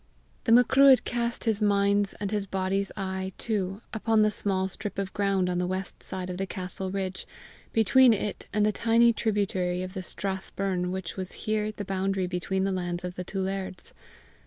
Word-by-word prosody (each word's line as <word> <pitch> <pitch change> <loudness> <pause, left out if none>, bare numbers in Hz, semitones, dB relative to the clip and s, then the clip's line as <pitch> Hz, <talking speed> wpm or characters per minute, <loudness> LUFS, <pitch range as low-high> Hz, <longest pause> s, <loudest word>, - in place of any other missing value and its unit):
The 225 - +2
Macruadh 260 +3 +7
cast 235 -1 -2
his 220 -2 +1
mind's 200 -1 +3
and 205 -1 -4
his 205 -2 -1
body's 195 +1 -1
eye 190 -1 -3
too 200 -2 -2
upon 220 0 +3
the 215 - +3
small 190 -2 0
strip 200 +2 -6
of 195 -1 -3
ground 195 -2 +1
on 180 -1 0
the 180 - 0
west 185 +1 -4
side 185 -1 -4
of 180 - -5
the 195 +1 -2
castle 185 0 -5
ridge, 190 -1 -4 0.4
between 245 +3 +6
it 210 -1 -2
and 210 0 +2
the 215 - +3
tiny 230 +2 +4
tributary 190 -5 0
of 185 0 -6
the 190 - -4
strath 190 +1 -4
burn 185 -2 -1
which 185 -1 -5
was 185 -1 -4
here 215 0 0
the 205 -1 -6
boundary 195 0 0
between 185 +1 -1
the 195 - +1
lands 175 -1 -2
of 180 0 -4
the 180 - -5
two 195 +2 -4
lairds. 190 -1 -4
195 Hz, 190 wpm, -27 LUFS, 185-210 Hz, 0.4 s, Macruadh